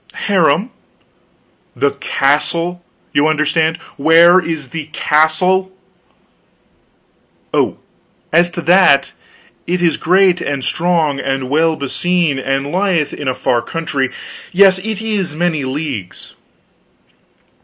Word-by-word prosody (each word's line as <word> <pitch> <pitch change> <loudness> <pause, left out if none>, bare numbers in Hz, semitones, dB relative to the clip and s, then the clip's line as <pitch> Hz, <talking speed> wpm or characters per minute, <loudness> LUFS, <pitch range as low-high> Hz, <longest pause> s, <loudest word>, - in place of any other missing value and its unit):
"Harem?" 185 - +1 1.0
"The 140 - +1
castle, 165 +6 -1 0.3
you 145 +2 +3
understand; 155 +1 +1 0.2
where 165 +5 +6
is 160 -6 -5
the 160 +2 -6
castle?" 180 +6 +1 1.8
"Oh, - - 0 0.6
as 175 +2 +4
to 170 - -6
that, 170 -4 +4 0.6
it 180 +1 -1
is 170 -2 +1
great, 185 +1 +2
and 140 -2 -3
strong, 165 -5 0
and 135 -1 -3
well 160 +2 +2
beseen, 150 +2 -1
and 135 +2 -2
lieth 180 -5 0
in 145 - -6
a 130 - 0
far 120 - 0
country. 140 -1 -3 0.4
Yes, 190 0 +5
it 215 +2 -5
is 195 -8 -2
many 160 -4 -1
leagues." 130 - -6
160 Hz, 110 wpm, -16 LUFS, 140-180 Hz, 1.8 s, where